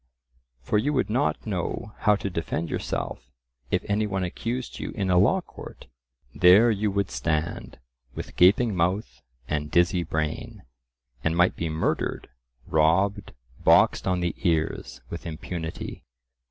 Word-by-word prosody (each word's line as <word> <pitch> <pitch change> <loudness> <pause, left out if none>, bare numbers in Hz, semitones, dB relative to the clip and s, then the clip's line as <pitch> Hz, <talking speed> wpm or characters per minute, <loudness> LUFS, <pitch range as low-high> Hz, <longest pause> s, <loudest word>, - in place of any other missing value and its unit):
For 105 - +1
you 145 +7 0
would 130 -6 0
not 130 +6 0
know 105 +1 -3
how 105 -1 +4
to 100 - -3
defend 80 -1 -3
yourself - - -4 0.4
if - - 0
any 105 +1 +1
one 95 -2 -2
accused 120 +8 -4
you - - -4
in 95 -3 -1
a 90 - +4
law 145 - +3
court,—there 65 - +1
you 105 0 0
would 100 -1 -1
stand, 80 -1 -2 0.4
with - - -7
gaping 100 +4 +4
mouth 90 - -1 0.3
and 75 0 -2
dizzy 85 +2 +3
brain, 80 -2 -3 0.6
and 80 +1 0
might 90 +1 +4
be 85 - -3
murdered, 80 +1 -2 0.4
robbed, 95 +6 +2 0.3
boxed - - +4
on 90 -1 +1
the 85 -1 0
ears 80 -4 -1
with 85 +1 -6
impunity. 80 0 -6
90 Hz, 140 wpm, -26 LUFS, 80-105 Hz, 0.6 s, how